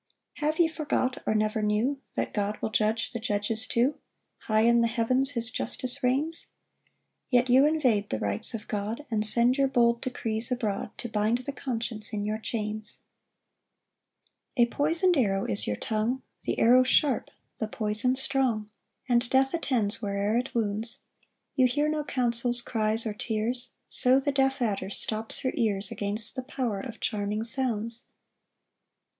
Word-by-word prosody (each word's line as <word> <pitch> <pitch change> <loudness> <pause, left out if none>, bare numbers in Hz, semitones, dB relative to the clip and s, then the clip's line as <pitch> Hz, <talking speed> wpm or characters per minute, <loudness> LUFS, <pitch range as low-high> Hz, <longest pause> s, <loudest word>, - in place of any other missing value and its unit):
2 295 - -2
Have 310 +1 0
ye 340 - +4
forgot, 290 -5 -2
or 215 - +1
never 215 0 0
knew, 220 +7 0
That - - -2
God 205 0 -2
will 220 - -3
judge 220 +1 0
the 235 - -5
judges 220 +1 -1
too? 250 +5 +1 0.4
High 215 0 +1
in 235 +1 +4
the 230 - +3
heavens 255 +4 +1
his 235 0 +5
justice 255 +2 -3
reigns? 280 +6 0 0.8
Yet 245 -1 +2
you 265 +3 +6
invade 250 -10 +1
the - - -1
rights 100 - -1
of 215 - -8
God, 215 +7 -4
And 215 -1 0
send 235 +5 +3
your 275 - +4
bold 235 -3 +2
decrees 230 -2 +5
abroad, 215 -5 -2
To - - -5
bind 220 +1 0
the 280 - -3
conscience 230 -5 -3
in 205 -1 -2
your 215 +1 -2
chains. 215 -1 -4 1.6
3 240 -3 +5
A - - -11
poison'd 330 +6 +2
arrow 195 -6 +1
is 105 0 0
your 105 - 0
tongue, 225 +4 -2 0.2
The - - -1
arrow 245 +3 +6
sharp, 260 -1 +2 0.3
the 220 - -2
poison 215 +3 -1
strong, 255 -5 0 0.4
And 240 -1 +2
death 265 +1 +2
attends 230 -10 -1
where'er 200 +1 -1
it 245 +2 -2
wounds: 225 +3 +1 0.5
You 255 -3 +4
hear 290 +4 0
no 305 0 -1
counsels, 240 -3 +1
cries 220 0 -1
or 215 - -2
tears; 225 +3 -3 0.2
So 255 +2 +5
the 285 +1 -1
deaf 270 -1 +1
adder 200 -4 -2
stops 220 +2 -4
her 260 - -1
ears 200 -3 0
Against 210 +3 -1
the 260 - -3
power 255 -6 -3
of 230 +1 -8
charming 210 0 -2
sounds. 230 -2 -1
235 Hz, 165 wpm, -27 LUFS, 215-260 Hz, 1.6 s, you